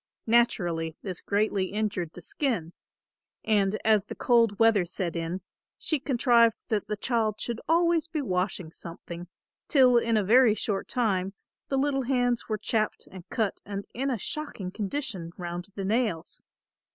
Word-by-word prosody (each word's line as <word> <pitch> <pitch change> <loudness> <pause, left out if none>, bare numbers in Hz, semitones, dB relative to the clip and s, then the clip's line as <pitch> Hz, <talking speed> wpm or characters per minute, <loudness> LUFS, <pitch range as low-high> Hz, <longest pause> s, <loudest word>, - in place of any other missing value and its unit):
Naturally 175 -9 +2
this 185 -3 -4
greatly 200 -1 +1
injured 200 -5 -2
the 180 - -11
skin, 215 - -2 0.7
and 210 -1 +2
as 215 -3 +4
the - - -7
cold 230 -4 +3
weather 225 -4 +5
set 175 0 -3
in, 170 +3 -3 0.4
she 310 - -1
contrived 240 -4 +4
that 210 -3 0
the 210 0 -2
child 220 -2 0
should 235 -1 -3
always 335 -1 +3
be 320 -2 -3
washing 185 - -1
something, 170 +1 -8 0.4
till 255 -5 +6
in 230 -1 +1
a 210 - +2
very 230 +2 +5
short 205 -3 -2
time 195 -5 0 0.3
the 270 - 0
little 270 0 +1
hands 245 -2 0
were 215 - 0
chapped 215 0 -1
and 185 -2 -11
cut 220 -3 -1
and 200 0 -5
in 270 +3 -1
a 250 - 0
shocking 220 -6 -5
condition 200 - -4
round 175 0 -5
the 195 - -3
nails. 215 -6 -1
215 Hz, 155 wpm, -27 LUFS, 185-240 Hz, 0.7 s, till